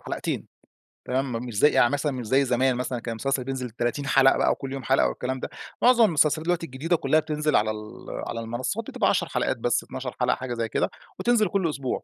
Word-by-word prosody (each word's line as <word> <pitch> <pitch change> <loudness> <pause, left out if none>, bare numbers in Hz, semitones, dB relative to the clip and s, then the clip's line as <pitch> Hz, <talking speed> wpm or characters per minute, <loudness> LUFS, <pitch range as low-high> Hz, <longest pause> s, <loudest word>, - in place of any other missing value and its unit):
حلقتين، - - -4 0.6
تمام، 130 +1 -1
م 115 +1 -3
مش 120 -4 -6
زي 150 - +6
يعني 120 - +4
مثلًا 145 +1 0
مش 125 -3 -5
زي 135 +4 +3
زمان 130 +1 +2
مثلًا 125 0 -3
كان 115 - -5
المسلسل 135 +3 -1
بينزل 130 -1 -4
30 120 +5 -2
حلقة 135 0 +5
بقى - - +3
وكل 135 - -4
يوم 135 -1 -5
حلقة 135 +4 +3
والكلام 130 +1 -3
ده. - - -5 0.3
معظم 240 -2 +6
المسلسلات 155 -3 +2
دلوقتي 175 -1 0
الجديدة 155 +5 -1
كلها 155 -1 +2
بتنزل 150 -1 -1
على 110 +1 +3
ال 105 0 -9 0.2
على 115 - -4
المنصات 120 +2 -3
بتبقى - - +1
10 - - +1
حلقات - - -1
بس، - - 0
12 - - -6
حلقة، - - +2
حاجة 130 -1 -5
زي 115 -1 -2
كده، - - 0 0.3
وتنزل 235 -3 +3
كل 190 -4 0
أسبوع. 140 -4 -3
130 Hz, 220 wpm, -25 LUFS, 120-150 Hz, 0.6 s, زي